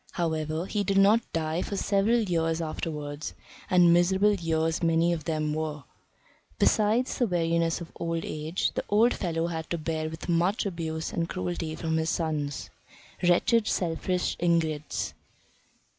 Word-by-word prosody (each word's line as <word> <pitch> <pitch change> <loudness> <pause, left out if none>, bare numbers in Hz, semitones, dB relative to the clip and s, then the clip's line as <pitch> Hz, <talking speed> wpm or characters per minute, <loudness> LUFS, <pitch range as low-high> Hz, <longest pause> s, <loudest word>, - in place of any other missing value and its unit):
However, 160 -1 -1
he 205 +1 -1
did 195 0 0
not 210 +4 +4
die 160 +1 -1
for 200 - -3
several 200 +4 +2
years 165 -5 0
afterwards; 150 -2 -4 0.3
and 175 -2 +6
miserable 190 +4 +4
years 165 -3 0
many 165 +1 +3
of 160 -3 -5
them 155 -2 -1
were. 155 -2 -3 0.7
Besides 220 +4 +2
the 245 - +3
weariness 170 -2 +1
of 170 - -8
old 165 -1 -2
age, 155 +4 -2
the - - -2
old 220 +4 +4
fellow 165 -3 -1
had 160 -2 -4
to 170 - -1
bear 155 0 -2
with 160 0 -8
much 175 +5 +1
abuse 160 -4 -3
and 165 -1 -1
cruelty 90 - -3
from 160 -1 -1
his 160 0 0
sons. 150 -5 -2 0.5
Wretched, 210 +6 +3
selfish 180 +1 -1
ingrates! 160 -4 0
165 Hz, 145 wpm, -27 LUFS, 160-180 Hz, 0.7 s, and